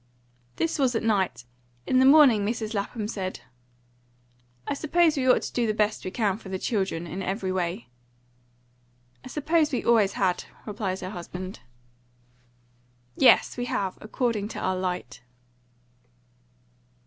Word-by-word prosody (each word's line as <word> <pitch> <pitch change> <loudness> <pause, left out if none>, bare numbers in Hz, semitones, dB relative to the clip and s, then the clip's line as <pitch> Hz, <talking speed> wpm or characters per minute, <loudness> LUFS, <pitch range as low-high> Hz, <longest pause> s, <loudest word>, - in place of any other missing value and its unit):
This 330 -1 -1
was 260 -3 +2
at 225 - 0
night. 190 - 0 0.4
In 255 - +3
the 260 - +6
morning 270 -8 +7
Mrs. 220 +1 -2
Lapham 210 +1 -3
said 190 -4 -4 1.3
"I - - 0
suppose 320 +2 +2
we 260 -2 +1
ought - - +4
to - - -6
do 240 -2 +1
the 215 - 0
best 210 0 0
we - - -3
can 200 -1 0
for 200 - -11
the 190 - -2
children, 190 -5 -2
in 180 +3 -5
every 190 0 -2
way." 185 +3 -2 1.4
"I - - -9
supposed 305 +3 +1
we 255 - -1
always 215 -5 +3
had," 185 -2 0 0.2
replied 200 -3 -3
her 185 0 -5
husband. 185 +1 -7 1.6
"Yes, 260 - +5
we 245 - -2
have, 195 -5 -2
according 215 -2 -1
to - - -7
our 185 - 0
light." 180 -10 -4
210 Hz, 145 wpm, -26 LUFS, 185-245 Hz, 1.6 s, morning